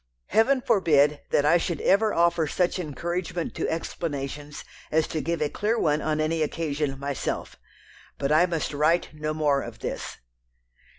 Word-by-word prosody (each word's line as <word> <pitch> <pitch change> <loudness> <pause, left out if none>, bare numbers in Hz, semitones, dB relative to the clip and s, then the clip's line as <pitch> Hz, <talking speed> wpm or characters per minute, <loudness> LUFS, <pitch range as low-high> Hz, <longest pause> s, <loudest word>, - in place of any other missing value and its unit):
Heaven 255 +4 +3
forbid 150 - +3
that 145 - +2
I 160 +4 +5
should 165 -2 -2
ever 215 +2 +3
offer 170 -2 +2
such 180 +4 0
encouragement 170 +2 -3
to - - -2
explanations 145 -3 -4 0.2
as 160 +1 +2
to 155 - -2
give 170 -1 -1
a - - +1
clear 215 +8 0
one 150 -6 +1
on 155 0 -1
any 160 +1 0
occasion 150 -3 -1
myself! 140 -1 -3 0.6
But 140 0 -1
I 160 +4 +5
must 165 -3 -2
write 155 +3 +2
no 155 0 -3
more 145 -3 +2
of 120 -1 -8
this." - - -5
155 Hz, 160 wpm, -26 LUFS, 145-170 Hz, 0.6 s, I